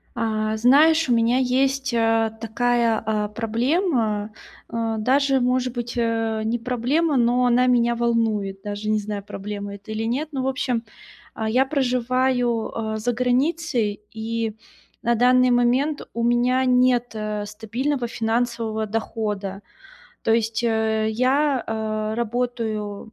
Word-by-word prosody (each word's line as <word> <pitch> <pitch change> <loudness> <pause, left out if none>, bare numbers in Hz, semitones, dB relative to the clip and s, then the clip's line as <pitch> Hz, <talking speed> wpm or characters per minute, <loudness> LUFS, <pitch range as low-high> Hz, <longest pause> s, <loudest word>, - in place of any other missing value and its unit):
А 215 -1 -1
знаешь, 300 +7 +5
у 245 - +4
меня 230 +2 +3
есть, 265 +1 +1
э, 225 -1 +2
такая, 235 0 +1
а, 210 -1 0
проблема. 225 - 0 0.4
Э, 225 -1 -2
даже, 270 +4 +2
может 250 0 +1
быть, 240 -1 -4
э, 225 -2 0
не 230 +2 0
проблема, 255 +6 0
но 245 +1 +3
она 245 +1 +3
меня 240 -1 +3
волнует. 225 -5 0
Даже 205 +1 -4
не 215 - +2
знаю, 205 -1 -4
проблема 205 0 -6
это 200 +2 -12
или 220 +1 -2
нет. 260 +7 -1
Ну, 270 -2 -2
в 260 - 0
общем, 255 -3 -1 0.5
а, 220 - -3
я 250 +4 +3
проживаю, 255 -3 0 0.2
э, - - -2
за 240 +3 -1
границей, 250 -3 0
и 225 0 -3 0.5
на 235 - +2
данный 250 +2 +4
момент 250 +5 +2
у 235 - -3
меня 240 +2 +2
нет, 250 -1 +3
э, 210 -1 -3
стабильного 240 +6 -2
финансового 230 -1 -1
дохода. 210 -2 -3 0.6
То 225 - +2
есть, 225 0 0
э, 220 -1 +1
я, 260 +4 +1
э, 215 -1 -2
работаю, 225 -3 -3
235 Hz, 140 wpm, -23 LUFS, 220-250 Hz, 0.6 s, знаешь